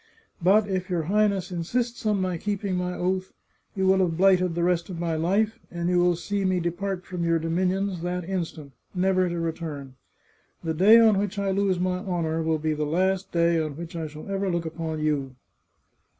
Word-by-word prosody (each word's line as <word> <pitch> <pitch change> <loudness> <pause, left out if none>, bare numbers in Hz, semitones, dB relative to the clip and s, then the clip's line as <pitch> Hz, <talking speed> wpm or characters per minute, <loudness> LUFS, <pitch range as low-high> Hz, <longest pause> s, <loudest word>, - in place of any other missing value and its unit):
But 200 +4 +4
if 185 -1 -2
your 175 -3 0
Highness 200 +1 +1
insists 230 +7 -2
on 210 -2 +2
my 185 -1 -1
keeping 200 -1 -2
my 180 0 -2
oath, 185 +1 -2 0.4
you 190 -1 0
will 190 0 +4
have 170 -4 +1
blighted 185 -2 +4
the 170 - 0
rest 175 0 +1
of 175 -3 -6
my 170 -1 -1
life, 205 +7 +1
and 170 0 -2
you 180 0 +3
will 175 0 +3
see 200 +4 -2
me 185 -1 +1
depart 180 +2 -3
from 180 -2 -4
your 165 0 +2
dominions 180 +3 -1
that 180 0 -3
instant, 165 -6 -4 0.2
never 185 0 +2
to 170 0 -3
re 165 -1 0
turn. 145 -5 -7 0.7
The 165 -1 -1
day 205 +8 +7
on 220 -4 +5
which 205 0 -2
I 200 -1 0
lose 195 -2 +1
my 180 0 0
honour 170 -4 -1
will 160 0 +1
be 155 0 -1
the 150 0 -2
last 185 +5 0
day 170 -1 +3
on 155 -2 -3
which 170 0 -7
I 160 -2 -3
shall 150 0 -10
ever 195 0 -1
look 170 -1 -1
upon 160 -1 -4
you." 140 -4 -1
180 Hz, 205 wpm, -25 LUFS, 165-190 Hz, 0.7 s, day